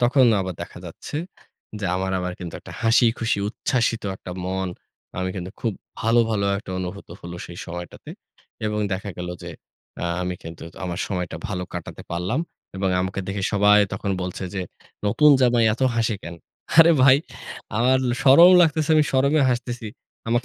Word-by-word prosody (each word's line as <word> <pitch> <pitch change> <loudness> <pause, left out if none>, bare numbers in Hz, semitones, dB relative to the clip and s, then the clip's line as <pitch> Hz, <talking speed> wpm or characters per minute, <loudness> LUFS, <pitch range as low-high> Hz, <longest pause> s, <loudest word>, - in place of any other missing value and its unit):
তখন 125 +2 +5
আবার 95 -1 -3
দেখা - - -10
যাচ্ছে - - -7 0.6
যে, - - -3
আমার 95 0 -2
আবার 90 0 -3
কিন্তু 85 -2 -6
একটা - - -11
হাসি-খুশি, 115 -1 +3
উচ্ছ্বসিত 115 0 0
একটা 90 - -8
মন 95 0 -2 0.5
আমি 95 0 -1
কিন্তু 90 0 -5
খুব 115 -3 0 0.3
ভালো, 115 0 +4
ভালো 100 -2 0
একটা 100 - -10
অনুভূত 95 +2 -6
হল 85 - -8
সেই 85 0 -10
সময়টাতে। 85 0 -8 0.6
এবং 105 0 -1
দেখা 100 +2 -3
গেল 90 0 -5
যে, - - -7 0.5
আ - - 0 0.2
আমি 90 0 -2
কিন্তু 80 0 -9 0.2
আমার 90 -1 -4
সময়টা 90 -3 -3
ভালো 95 -3 -3
কাটাতে - - -7
পারলাম। 90 - -1 0.4
এবং 95 0 0
আমাকে 95 +1 -2
দেখে 100 0 -3
সবাই 105 0 +5 0.4
বলছে 90 +1 -4
যে, 95 - -2 0.5
"নতুন 150 +9 +5
জামাই 120 -2 +4
এত 125 - -5
হাসি 115 -1 +1
কেনো?" 85 0 -8 0.4
আরে 165 +1 +9
ভাই, 130 0 +8 0.6
আমার 125 +3 +4 0.2
শরম 165 +7 +8
লাগতেছে 160 -2 +1
আমি 155 -1 +5
শরমে 140 +3 +3
হাসতেছি। 120 -2 -3 0.4
আমাকে 120 +1 +1
105 Hz, 160 wpm, -23 LUFS, 90-125 Hz, 0.6 s, আরে